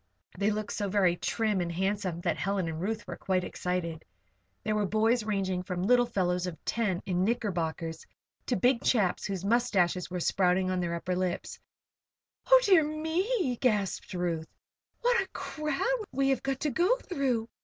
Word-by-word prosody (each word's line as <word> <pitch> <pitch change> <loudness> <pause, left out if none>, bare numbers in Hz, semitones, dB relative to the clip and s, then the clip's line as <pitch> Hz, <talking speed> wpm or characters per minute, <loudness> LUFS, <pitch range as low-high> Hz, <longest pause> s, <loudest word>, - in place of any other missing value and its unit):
They 200 +1 +1
looked 215 -1 -2
so 205 -1 -2
very 185 -3 +3
trim 215 +1 0
and 170 -1 -2
handsome 190 -1 -1
that 170 -3 0
Helen 195 +1 -1
and 160 0 -4
Ruth 210 +2 -2
were - - -6
quite 185 -1 0
excited. 180 -3 -3 0.6
There 215 - 0
were 210 -1 +1
boys 220 +3 +2
ranging 195 -4 -1
from 180 0 -3
little 245 +3 +4
fellows 180 -4 0
of 170 -2 -5
ten, 205 -6 0
in 180 -1 0
knickerbockers, 175 -7 -2 0.4
to 250 - +1
big 245 +4 +2
chaps 205 -8 +2
whose 195 -2 -4
mustaches 200 -6 +2
were 180 0 -3
sprouting 185 +1 +2
on 185 - 0
their 170 -1 -1
upper 180 +2 -2
lips. 180 -1 -2 0.9
"Oh, - - +10
dear 370 -6 +6
me!" 320 - 0
gasped 210 -7 0
Ruth. 170 -2 -2
"See - - -48
what 480 -2 +3
a 385 - -4
crowd 310 - -2
we 270 +1 +1
have 270 - +1
got 270 -1 -2
to 300 - 0
go 360 - +3
through. 270 - -1
200 Hz, 175 wpm, -29 LUFS, 180-245 Hz, 0.9 s, Oh